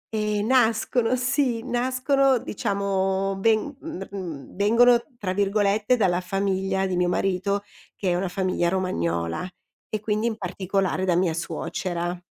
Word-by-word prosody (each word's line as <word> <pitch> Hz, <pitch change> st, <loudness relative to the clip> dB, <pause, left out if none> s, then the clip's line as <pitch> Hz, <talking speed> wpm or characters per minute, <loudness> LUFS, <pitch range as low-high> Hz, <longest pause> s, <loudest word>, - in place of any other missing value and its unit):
E 210 Hz, -1 st, 0 dB
nascono 230 Hz, 0 st, +2 dB
sì, 250 Hz, -2 st, 0 dB
nascono 260 Hz, +2 st, +2 dB
diciamo 195 Hz, -3 st, -1 dB
ven 225 Hz, +7 st, +2 dB
mhmm, 255 Hz, -, -6 dB
mhmm, 170 Hz, -9 st, -7 dB
"vengono" 235 Hz, +4 st, +5 dB, 0.2 s
tra 185 Hz, -5 st, -2 dB
virgolette 205 Hz, +3 st, +2 dB
dalla 185 Hz, -5 st, +2 dB
famiglia 195 Hz, 0 st, -1 dB
di 185 Hz, -1 st, -1 dB
mio 180 Hz, 0 st, +2 dB
marito, 195 Hz, +2 st, 0 dB, 0.3 s
che 190 Hz, -, -2 dB
è -, -, +2 dB
una 185 Hz, +2 st, -1 dB
famiglia 185 Hz, -1 st, 0 dB
romagnola, 85 Hz, -, -1 dB, 0.4 s
e 215 Hz, -, -2 dB
quindi 215 Hz, +1 st, 0 dB
in 225 Hz, -2 st, -2 dB
particolare 190 Hz, -1 st, -1 dB
da 180 Hz, -2 st, +2 dB
mia 175 Hz, -2 st, +2 dB
suocera. 175 Hz, 0 st, -3 dB
195 Hz, 135 wpm, -25 LUFS, 185-225 Hz, 0.4 s, vengono